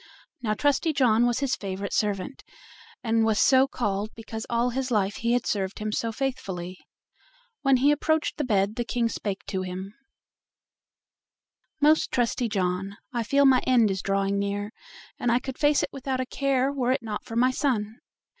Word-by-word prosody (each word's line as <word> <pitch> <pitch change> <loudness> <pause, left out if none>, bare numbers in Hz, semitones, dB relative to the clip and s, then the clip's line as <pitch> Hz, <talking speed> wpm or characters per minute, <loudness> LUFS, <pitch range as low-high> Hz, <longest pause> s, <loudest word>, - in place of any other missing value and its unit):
Now 215 -3 0
Trusty 290 +5 +1
John 240 -4 +3
was 240 +2 0
his 275 -2 +1
favorite 195 0 -5
servant, 210 +5 -1 0.6
and 225 -1 +2
was 220 -1 +2
so 265 0 +5
called 210 -5 -2
because 225 0 -7
all 235 +1 +1
his 260 +1 -2
life 205 -4 0
he 235 +1 0
had 245 -1 +1
served 195 -2 -2
him 215 0 -3
so 230 +2 -1
faithfully. 190 -8 -4 0.8
When 270 -2 +4
he 280 +4 +4
approached 315 +2 0
the 300 - -1
bed 210 -2 +1
the 240 - 0
King 235 -1 0
spake 200 -3 -4
to 190 - -3
him: 185 +2 -6 1.9
"Most 305 +2 +4
trusty 240 -1 0
John, 195 0 -2 0.2
I 240 - 0
feel 280 +5 +3
my 260 -2 +6
end 235 -5 +4
is 190 0 -2
drawing 195 0 0
near, 200 +1 -2 0.5
and 240 - +1
I 240 - +4
could 260 +1 -6
face 290 -1 +3
it - - -2
without 265 -1 -3
a 255 - -1
care 270 0 0
were 255 -3 0
it 260 - 0
not 215 -2 -4
for 225 - -8
my 250 +2 +4
son. 225 -5 -1
230 Hz, 180 wpm, -26 LUFS, 205-260 Hz, 1.9 s, my